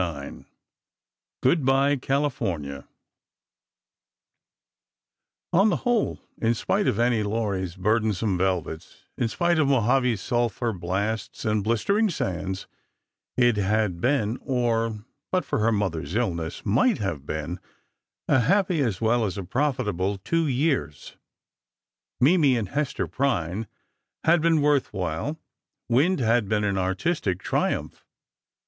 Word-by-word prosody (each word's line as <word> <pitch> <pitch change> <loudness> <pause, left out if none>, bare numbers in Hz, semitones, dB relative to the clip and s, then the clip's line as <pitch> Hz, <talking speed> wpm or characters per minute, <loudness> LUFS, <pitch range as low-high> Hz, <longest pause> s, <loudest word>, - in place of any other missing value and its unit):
IX 75 -6 -5 1.0
GOOD 140 +4 +3
BYE, 135 +2 +3
CALIFORNIA 110 - -2 2.7
On 195 +5 +5
the 180 - +2
whole, 240 -3 +1 0.2
in 115 +1 +2
spite 200 - 0
of 105 - +1
"Annie 120 -2 +2
Laurie's" 100 -4 -2
burdensome 105 0 +1
velvets, 90 -3 -2
in 120 - 0
spite 170 +7 +1
of 150 - +3
Mojave's 125 -3 +2
sulphur 120 0 -1
blasts 95 +5 -3
and 110 -2 +1
blistering 200 - +2
sands, 95 - -3 0.7
it 120 -3 +4
had 100 -3 0
been—or, 115 -3 0 0.3
but 185 -4 +1
for - - -1
her 115 +2 +3
mother's 90 -6 -2
illness, 85 -9 -2
might 135 - +3
have 95 -9 -3
been—a 80 - -4
happy 180 - +2
as 115 -7 -1
well 115 +1 +2
as 100 -4 -2
a 100 - -3
profitable 105 - -1
two 165 - 0
years. 130 - -1 1.0
Mimi 145 -2 +4
and 105 -5 -3
Hester 145 +2 -1
Prynne 105 - -1 0.6
had 170 0 +4
been 160 -2 +3
worth 145 -2 +2
while. 90 - -3 0.5
"Wind" 140 +10 +3
had 115 -3 +2
been 105 -1 +1
an 100 -2 0
artistic 95 - -1
triumph. - - -1
115 Hz, 115 wpm, -25 LUFS, 95-140 Hz, 2.7 s, On